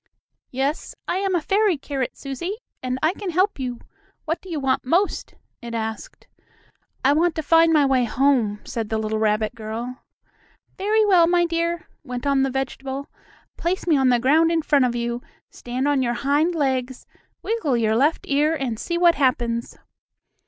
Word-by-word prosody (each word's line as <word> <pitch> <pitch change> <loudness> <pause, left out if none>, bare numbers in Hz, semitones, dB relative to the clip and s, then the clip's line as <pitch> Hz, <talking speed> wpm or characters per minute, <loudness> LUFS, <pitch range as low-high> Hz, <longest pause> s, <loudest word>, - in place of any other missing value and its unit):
"Yes, 270 +4 -2
I 360 - 0
am 385 -1 0
a 345 - +1
fairy 400 0 +2
carrot, 275 -2 -4
Susie, 285 +8 -4 0.3
and 255 0 -2
I 320 +3 +3
can 400 -1 -5
help 370 +1 +1
you. 250 -2 -4 0.5
What 325 +1 -2
do 380 - -13
you 320 -3 -2
want 270 -1 0
most?" 350 +10 0 0.3
it 235 -1 -6
asked. 220 -1 -5 0.8
"I 275 - +6
want 330 +2 +2
to 315 - -3
find 330 +2 +5
my 300 -3 +4
way 260 -2 +2
home," 235 -5 +1
said 225 -2 -4
the 220 - 0
little 220 0 -2
rabbit 215 +1 +1
girl. 230 +3 -6 0.8
"Very 425 +2 +2
well, 360 -5 +5
my 345 0 +3
dear," 335 0 -2 0.2
went 250 -1 -6
on 280 -1 +3
the 270 - +2
vegetable. 270 +1 -4 0.5
"Place 355 +2 -2
me 330 -3 +3
on 265 -2 +3
the 245 - +4
ground 305 +7 +3
in 330 -2 +1
front 285 -4 +3
of 240 -1 -1
you, 235 0 -2 0.3
stand 250 +3 -3
on 285 -2 +2
your 240 -1 0
hind 290 +7 +1
legs, 260 -4 -1 0.4
wiggle 360 - 0
your 220 -1 +1
left 290 +7 +2
ear, 295 +3 +2
and 250 -7 -3
see 340 - -2
what 345 -1 +5
happens." 240 -4 0
275 Hz, 180 wpm, -23 LUFS, 245-330 Hz, 0.8 s, I